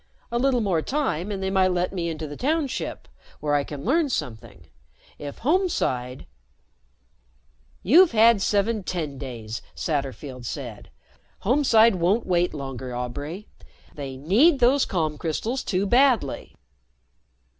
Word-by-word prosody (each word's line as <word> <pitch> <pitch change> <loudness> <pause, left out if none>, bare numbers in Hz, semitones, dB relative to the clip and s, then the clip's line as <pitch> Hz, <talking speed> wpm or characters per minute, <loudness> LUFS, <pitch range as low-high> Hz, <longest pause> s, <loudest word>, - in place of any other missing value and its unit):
A 235 - 0
little 255 -1 +2
more 185 -6 +1
time 210 - -2
and 195 -1 -4
they 190 - -1
might 190 -1 +3
let 180 0 -1
me 170 -3 -2
into 160 -1 -5
the 145 -1 -7
Township, 290 - -2 0.3
where 150 -1 -1
I 145 -1 +2
can 140 -1 -8
learn 300 +5 +2
something. 120 - -5 0.5
If 145 -1 -8
Homeside 230 - 0 0.8
" - - -38
"You've 330 - +6
had 225 -1 +5
seven 210 +2 +1
Tendays," 135 -10 -5
Satterfield 135 -3 -4
said. 120 -5 -7 0.5
"Homeside 230 -3 +4
won't 185 +7 +1
wait 175 -1 +1
longer, 135 -3 -6
Aubray. 145 +10 -5 0.5
They 135 -2 -7
need 225 - +4
those 260 +2 +4
calm 155 -5 -2
crystals 225 - -2
too 190 +1 0
badly." 240 - +2
175 Hz, 130 wpm, -24 LUFS, -, 0.8 s, You've